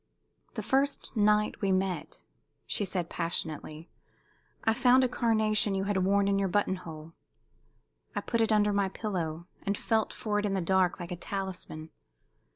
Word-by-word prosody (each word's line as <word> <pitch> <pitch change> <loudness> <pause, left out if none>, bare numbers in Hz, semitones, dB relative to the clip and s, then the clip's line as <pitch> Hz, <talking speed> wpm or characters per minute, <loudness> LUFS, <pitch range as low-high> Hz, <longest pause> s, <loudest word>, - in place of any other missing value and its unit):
"The - - -3
first 275 0 +1
night 210 0 +2
we 195 -2 +2
met," 185 -1 -1 0.4
she 205 - -1
said, 180 -3 -2
passionately, 160 -2 -4 0.7
"I 225 - +3
found 250 +2 +5
a - - +4
carnation 215 -4 +2
you 190 - 0
had 200 0 0
worn 200 +1 +3
in 200 0 +2
your 195 - +1
button 190 0 +1
hole. 160 -2 -10 1.0
I - - 0
put 230 -1 0
it 225 - +2
under 210 -1 +3
my 200 -1 +1
pillow, 170 -6 -3 0.2
and 200 0 -1
felt 220 -2 0
for 210 -2 -1
it 205 - -1
in 195 - -1
the - - +1
dark 185 +1 +2
like 175 -1 -6
a - - -2
talisman. 180 -4 -5
195 Hz, 165 wpm, -29 LUFS, 180-215 Hz, 1.0 s, found